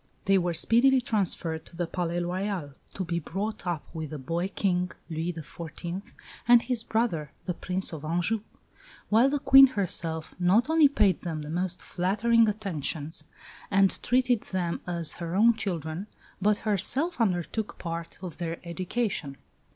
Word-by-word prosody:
They 195 0 +4
were 175 -1 -1
speedily 250 +9 +5
transferred 185 -8 -1
to - - -14
the 175 +1 -1
Palais 175 0 -2
Royal, 180 -3 -3 0.2
to 190 - -3
be 170 0 -1
brought 195 +5 -4
up 170 -4 -2
with 160 -3 -5
the 150 - -5
boy 165 +6 -2
King, 180 -2 0 0.2
Louis 165 +2 -2
XIV., 170 +5 -7 0.4
and 240 0 +8
his 245 -2 -1
brother, 220 -12 -1
the 180 - -1
Prince 185 +1 -1
of 155 -2 -7
Anjou; 175 +7 0 0.7
while 230 +5 +5
the 290 - 0
Queen 270 0 +8
herself 170 -8 -1
not 205 - +3
only 320 -2 +7
paid 205 -9 +2
them 160 -4 -4
the 150 - -7
most 180 +1 -2
flattering 220 +5 +2
attentions 165 -7 -3 0.4
and 195 0 +3
treated 250 -2 +2
them 175 -3 -3
as 170 -3 0
her 170 +1 -3
own 230 +4 +6
children, 175 -3 -4 0.3
but 210 +1 +3
herself 255 - 0
undertook 200 +1 -1
part 165 -1 -5
of 180 -2 -6
their 165 -1 -3
education. 180 - -2
180 Hz, 155 wpm, -28 LUFS, 170-220 Hz, 0.7 s, and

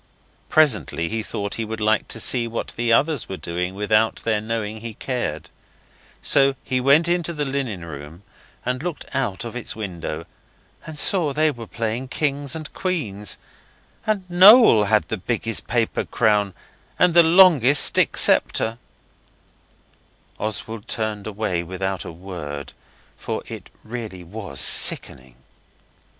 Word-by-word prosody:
Presently 145 - +2
he 110 0 -2
thought 100 -1 -5
he - - -1
would 110 0 -6
like 110 0 +1
to 110 - -4
see 120 +1 +1
what 115 0 -5
the 120 0 -2
others 145 +3 +1
were 95 - -5
doing 90 +2 -4
without 110 +2 +1
their 110 -2 0
knowing 110 -1 -4
he 115 -2 -7
cared. 120 - -4 0.7
So 135 0 +3
he 130 -1 -1
went 140 +6 +4
into 175 -1 0
the 150 -2 -3
linen 130 -10 -4
room 75 +3 -10 0.4
and 125 +1 -2
looked 175 -2 -5
out 120 -6 -2
of 115 - -7
its 125 - -4
window, 95 -6 -6 0.6
and 155 - -7
he - - -6
saw 165 -6 +1
they 155 +2 +2
were 120 -4 -10
playing 115 +3 -3
Kings 140 0 -2
and 155 -2 -8
Queens 110 - -3 0.7
and 200 -4 -1
Noel 185 - +7
had 105 +1 +2
the 110 - -3
biggest 115 +3 -3
paper 115 -1 0
crown 105 -4 +1 0.4
and 180 -2 +3
the 170 - +8
longest 160 -6 +6
stick - - +3
sceptre. 115 +1 +2 1.6
Oswald 110 0 -4
turned 110 -2 -3
away 105 -4 -2
without 95 +2 -4
a - - -7
word, 80 -5 -8 0.5
for - - -4
it - - -10
really 110 -6 -7
was 95 -6 -7
sickening. 65 -1 +3
115 Hz, 145 wpm, -22 LUFS, 100-140 Hz, 1.6 s, the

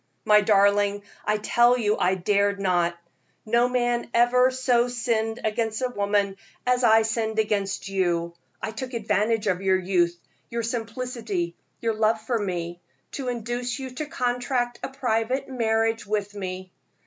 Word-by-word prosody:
"My 210 0 +6
darling, 205 0 +3 0.2
I 210 0 +2
tell 240 +3 +4
you 215 -3 +1
I 185 +1 +2
dared 200 +2 +1
not. 175 -3 +1 0.5
No 235 +3 +3
man 240 -1 0
ever 250 +2 +5
so 255 -2 +2
sinned 230 -2 -1
against 220 0 -1
a 255 - +1
woman 200 -3 0 0.3
as 250 0 +2
I 225 -1 +6
sinned 220 0 -1
against 205 -3 0
you. 175 -3 0 0.3
I 220 - -2
took 250 +4 -6
advantage 215 0 +1
of 185 -2 0
your 190 -1 +3
youth, 175 -2 +1 0.3
your 235 0 -2
simplicity, 225 -6 -3 0.3
your 230 -1 +1
love 220 +1 +2
for 225 +1 -1
me, 175 -3 -4 0.3
to 270 -3 -5
induce 245 +1 -3
you 265 -2 -6
to 290 +4 -5
contract 245 -1 -1
a - - -4
private 250 0 -1
marriage 225 -3 0
with 205 -1 -2
me. 185 -2 -6
220 Hz, 150 wpm, -25 LUFS, 200-240 Hz, 0.5 s, My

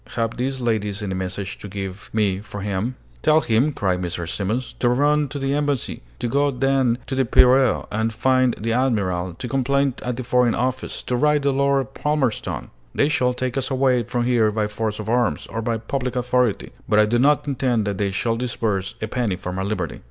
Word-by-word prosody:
Have 115 -1 -1
these 130 +2 -2
ladies 105 -4 -1
any 95 -2 -2
messages 95 +3 -4
to - - -8
give 100 +1 -6
me 100 -4 +1
for 100 0 -8
him?" 105 +5 -2 0.3
"Tell 155 0 +5
him," 120 +6 +2
cried 95 -8 -1
Mrs. 85 -1 -3
Simons, 105 +8 -2
"to 120 - +3
run 145 +4 +3
to 145 - -6
the 135 0 -1
embassy, 145 -3 -1 0.2
to - - -2
go 140 +4 +2
then 135 -2 +2
to - - -5
the 135 0 +2
Piraeus 125 +1 +4
and 110 +2 0
find 130 +2 +2
the 115 +2 -1
admiral, 95 -9 0
to 125 - -6
complain 135 +2 +1
at 125 -1 -3
the 130 - -3
foreign 125 -1 +2
office, 130 +1 -2
to 125 - -1
write 150 +2 +2
to 140 - +3
Lord 140 0 +1
Palmerston! 145 -7 -1 0.2
They 145 - +3
shall 125 -4 +1
take 130 0 -2
us 130 - -3
away 130 -2 +2
from 120 +2 -2
here 120 -3 +3
by 105 0 0
force 105 0 -3
of 105 - -5
arms, 120 0 +1
or 115 - -4
by 115 0 -1
public 125 +2 -3
authority, 125 -3 +1 0.2
but 105 - +3
I 105 - +6
do 120 +3 +1
not 145 +2 +3
intend 125 -5 0
that 100 -2 -2
they 100 -1 +1
shall 115 +4 0
disburse 110 -4 -2
a - - -1
penny 115 -4 -1
for 90 0 -6
my 95 - -3
liberty." 95 - -3
120 Hz, 210 wpm, -22 LUFS, 105-130 Hz, 0.3 s, I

